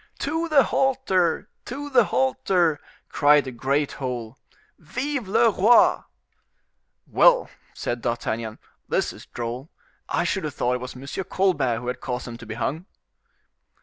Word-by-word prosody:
"To 325 +3 -2
the 290 -4 +6
halter! 250 -11 +1 0.2
to 290 +3 -6
the 245 -4 +5
halter!" 160 +3 +1 0.3
cried 145 0 +4
the 130 - -6
great 135 +4 0
whole; 125 -3 -5 0.4
"Vive 255 - -3
le 220 +3 +4
roi!" 215 +5 +5 1.0
"Well," - - +4 0.2
said 120 0 -3
D'Artagnan, 115 -2 -3 0.3
"this - - 0
is - - -14
droll; 120 +5 -5 0.4
I - - +1
should - - -1
have - - -5
thought 125 +1 0
it 125 - -2
was 125 +1 -7
M. 130 +2 -10 0.2
Colbert 145 -11 +1
who 120 +1 -7
had 125 0 -4
caused 125 -1 -4
them 120 -1 -7
to 120 -1 -12
be 110 - -5
hung." 155 - -3
145 Hz, 150 wpm, -24 LUFS, -, 1.0 s, the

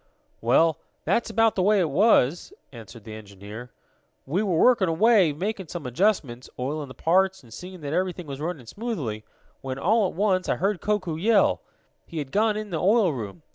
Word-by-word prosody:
"Well, 160 +7 +3 0.3
that's 235 - +1
about 225 0 +3
the 190 - -1
way 205 +2 +3
it 165 -5 0
was," 175 - +3 0.2
answered 115 -2 -12
the 110 0 -9
engineer. 105 +3 -10 0.6
"We 165 +9 0
were 190 -6 0
working 230 -2 +4
away, 195 0 +4
making 190 +4 -4
some 165 -2 -7
adjustments, 130 - 0
oiling 145 +3 -3
the 130 - -12
parts 190 +5 +1
and 115 -3 -15
seeing 180 +3 -9
that 145 0 -4
everything 180 0 -2
was 140 -1 -7
running 160 -6 -4
smoothly, 140 - -5 0.4
when, 130 -1 -5
all 210 +7 +2
at - - -8
once, 185 -1 +1
I - - +2
heard 195 0 -1
Koku 185 -7 -1
yell. 210 +4 +3 0.5
He 165 - -8
had 140 -3 -4
gone 215 +1 +2
in 215 -2 -6
the 160 - -2
oil 200 -3 +3
room. 120 +5 -7
175 Hz, 185 wpm, -25 LUFS, 135-205 Hz, 0.6 s, working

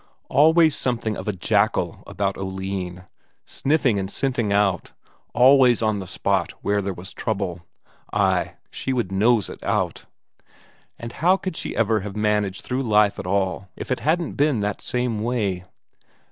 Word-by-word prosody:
Always 160 +3 +5
something 115 -4 -1
of 95 - -7
a - - +2
jackal 95 -3 0
about 100 -1 -2
Oline; 95 -1 -5 0.4
sniffing 135 -7 +1
and 95 0 -3
scenting 125 -4 -1
out, 100 -3 +1 0.4
always 125 -1 +5
on 110 -2 +1
the 95 - -7
spot - - -1
where 100 0 +1
there 100 0 -2
was 90 +1 -8
trouble; 90 -5 -3 0.4
ay, - - +1 0.2
she 135 - -3
would 120 -7 -1
nose 105 +2 +3
it - - -10
out. - - -1 0.9
And 115 0 -7
how 180 +8 +3
could 185 -3 -5
she - - -4
ever 110 -1 +2
have 100 0 -7
managed 105 -2 0
through 130 +1 -2
life 105 -5 +3
at 100 - -5
all 95 0 -1
if - - -7
it 130 - 0
hadn't 165 +3 0
been 145 -6 +1
that 105 -1 -2
same 125 -3 -1
way? 105 -6 -1
105 Hz, 160 wpm, -23 LUFS, 95-125 Hz, 0.9 s, Always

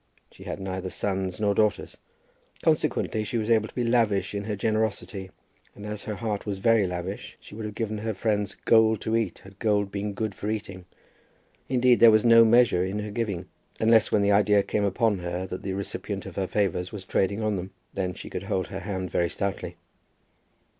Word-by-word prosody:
She - - -14
had - - -5
neither 95 -1 -4
sons 95 -1 -2
nor 105 -1 +2
daughters. 105 +1 0 0.7
Consequently 110 - +1
she 105 +3 -2
was 110 +1 -1
able 110 -1 +3
to - - -17
be 125 - 0
lavish 110 -5 +1
in 100 0 -3
her 105 -1 -2
generosity; 110 -2 -2 0.5
and 100 - -9
as 105 -1 -6
her 105 - -3
heart 105 -2 -3
was 100 -2 -2
very 110 0 +3
lavish, 90 +2 -5
she - - -14
would 110 +1 -6
have 105 -1 -6
given 110 -2 -2
her 110 0 -3
friends 105 -1 -1
gold 110 -2 +5
to 110 - -1
eat 110 -6 -1
had 95 0 -15
gold 105 -3 +1
been 100 0 -3
good 110 0 -3
for 105 +2 -5
eating. 95 -4 -5 0.8
Indeed 125 -1 +4
there 115 - +9
was 110 +1 +4
no 115 0 +8
measure 115 -5 +4
in 95 +2 -2
her 105 0 -4
giving, 105 -5 -2 0.3
unless 110 -1 +4
when 105 - +3
the 100 - +3
idea 100 0 +4
came 105 0 0
upon 105 0 +1
her 90 +1 -3
that 95 0 -6
the 95 - -3
recipient 100 0 -4
of - - -9
her 95 -1 -1
favours 95 -3 -1
was 100 -3 -8
trading 100 +3 0
on 105 -1 +1
them. 95 0 -4 0.2
Then 90 -2 -2
she - - -9
could 90 - -4
hold 95 -1 -1
her 95 - -5
hand 95 -2 -4
very 85 -1 +1
stoutly. 95 -2 -4
105 Hz, 205 wpm, -26 LUFS, 95-110 Hz, 0.8 s, there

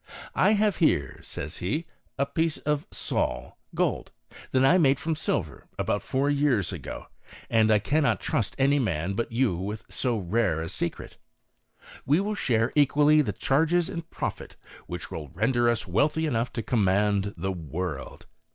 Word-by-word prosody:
" - - -17
I 210 - +5
have 210 -1 +2
here," 70 - +1
says 75 +4 -6
he, 135 - -2 0.2
" - - -42
a 140 - +2
piece 160 +2 0
of 150 -1 -2
sol - - -2 0.2
(gold) - - 0 0.4
that 130 0 +3
I 180 +7 +5
made 140 -4 +4
from 160 0 -1
silver, 85 - -3
about 100 - 0
four 135 +1 0
years 140 - +1
ago, - - -7 0.5
and 110 -1 +4
I 110 - +6
cannot 140 +8 +1
trust 110 - -1
any 140 +2 +3
man 95 - -1
but 115 +4 -2
you 115 -5 +1
with 105 +5 -5
so 125 -3 -1
rare 95 -3 0
a 80 - -5
secret. 85 -2 -4 0.9
We 145 +5 +3
will 205 +2 -1
share 115 - +1
equally 150 +1 +5
the - - -1
charges 165 +5 +1
and 165 0 -6
profit, - - -5 0.3
which - - -6
will 75 -2 -5
render 120 +4 +2
us 120 -2 0
wealthy 150 - +1
enough 120 -5 -1
to 115 - -3
command 100 -2 +1
the 95 - -2
world." 80 -3 -5
120 Hz, 170 wpm, -27 LUFS, 100-150 Hz, 0.9 s, I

